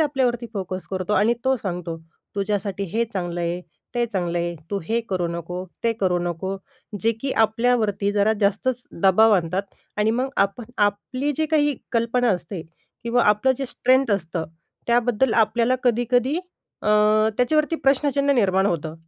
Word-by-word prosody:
आपल्यावरती 255 -5 +1
फोकस 185 -2 -4
करतो 185 +1 -2
आणि 215 +3 +3
तो 265 0 +3
सांगतो, 175 -6 -4 0.4
"तुझ्यासाठी 200 -1 -2
हे 230 +1 +2
चांगलं 175 -2 -3
आहे, 170 +1 -2 0.3
ते 240 0 +2
चांगलं 175 -6 -2
आहे, 170 0 -2 0.2
तू 200 - 0
हे 230 +7 0
करू 180 -2 0
नको, 170 +2 -5 0.2
ते 230 - +3
करू 180 -2 +2
नको." 175 +2 -3 0.4
जे 225 +1 +2
की 270 +1 -2
आपल्यावरती 220 -3 +1
जरा 205 +1 +3
जास्तच 220 +5 +1 0.2
दबाव 215 +3 +6
आणतात. 180 +2 -1 0.3
आणि 210 +1 +2
मग, 255 +4 0
आप 200 +4 +1 0.2
आपली 210 +8 0
जी 315 - +1
काही 295 -3 +2 0.2
कल्पना 235 +1 +2
असते 180 -1 -3 0.4
किंवा 235 +1 +2
आपलं 210 +6 +4
जे 270 - -2
स्ट्रेंथ 255 0 +2
असतं, 170 -3 -3 0.4
त्याबद्दल 240 0 +2
आपल्याला 235 +2 +3
कधी-कधी 245 +5 +2 0.4
अ, - - -1 0.5
त्याच्यावरती 305 +6 +2
प्रश्नचिन्ह 280 +1 +3
निर्माण 195 -5 +3
होतं. 160 -4 -2
215 Hz, 150 wpm, -23 LUFS, 185-245 Hz, 0.5 s, दबाव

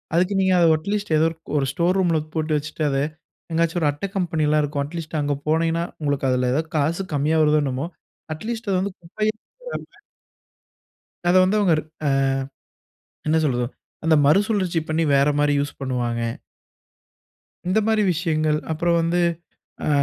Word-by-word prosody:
அதுக்கு 180 +3 +2
நீங்க 190 -1 +3
அதை 170 - +5
அட்லீஸ்ட் 200 +4 -3
ஏதோருக் 160 +1 -1
1 140 - +2
ஸ்டோர் 175 +6 +1
ரூம்‌ல 170 -4 +2 0.2
போட்டு 155 -1 0
வச்சுட்டு 155 +1 -4
அத, 135 - 0 0.6
எங்காச்சு 165 +1 +1
1 150 - +3
அட்டை 145 +7 -5
கம்பெனியல்லாம் 155 -4 +1
இருக்கும். 145 -1 -1
அட்லீஸ்ட் 160 0 -5
அங்க 145 0 0
போனீங்கன்னா, 165 +2 +1 0.2
உங்களுக்கு 145 -2 0
அதுல 125 0 +1
ஏதாவது 160 +3 -1
காசு 160 +6 0
கம்மியா 150 +3 +2
வருதோ 150 0 +4
என்னமோ, 135 +4 -2 0.5
அட்லீஸ்ட் 225 +6 -5
அது 185 - +2
வந்து 200 -1 -3
குப்பையில் 215 +5 -2 0.3
போடாம - - -8 1.3
அத 175 - +4
வந்து 195 +3 +2
அவங்க 190 -4 +3 0.3
ஆ - - +3 1.2
என்ன 155 +1 +3
சொல்றது 125 -4 +1 0.4
அந்த 160 -1 +4
மறுசுழற்சி 185 0 +2
பண்ணி 160 +1 +1
வேற 140 +1 +4
மாரி 145 0 +3
யூஸ் 145 +1 -4
பண்ணுவாங்க. 120 -3 -1 1.5
இந்த 190 - +3
மாரி 220 -1 +3
விஷயங்கள். 155 -2 0
அப்புறம் 170 +2 +1
வந்து, 170 +2 +1 0.7
ஆ - - +2
160 Hz, 150 wpm, -23 LUFS, 145-180 Hz, 1.5 s, அதை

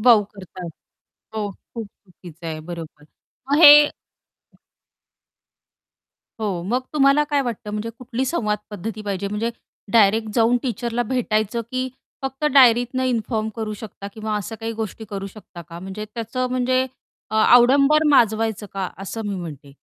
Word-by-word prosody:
बाऊ 230 -2 +6
करतात. 185 -2 -9 0.7
हो, 210 -2 -2 0.2
खूप 225 -3 -5
चुकीचं 175 -4 -13
आहे, 155 -1 -4
बरोबर. 160 -2 -9 0.5
मग 290 - +4
हे 290 - +13
हं. - - -6 2.5
हो, 195 -5 -2
मग 245 +5 +1
तुम्हाला 285 0 +4
काय 285 - +3
वाटतं, 235 -3 -5
म्हणजे 210 +2 -3
कुठली 250 +1 -3
संवाद 210 -8 -1
पद्धती 215 +2 -6
पाहिजे? 200 -1 -3
म्हणजे 210 +3 -2 0.4
डायरेक्ट 220 0 +4
जाऊन 235 +1 +4
टीचरला 240 -1 -2
भेटायचं, 225 -2 -1
की 255 0 -2 0.3
फक्त 270 +2 -4
डायरीतनं 245 -1 +5
इन्फॉर्म 225 -3 -1
करू 220 -1 -3
शकता 205 -2 -9
किंवा 215 -1 -3
अशा 205 +2 -5
काही 225 0 -3
गोष्टी 220 0 -5
करू 195 -1 -4
शकता 195 -3 -12
का? 165 +1 -11
म्हणजे 190 +4 -6
त्याचं 235 +2 -2
म्हणजे 255 +1 +1 0.4
अ, - - -4 0.2
आडंबर 275 +5 +5
माजवायचं 220 -5 +2
का? 195 -2 -2
असं 225 +3 -5
मी 200 - -2
म्हणते. 150 -6 -8
220 Hz, 145 wpm, -22 LUFS, 200-245 Hz, 2.5 s, हे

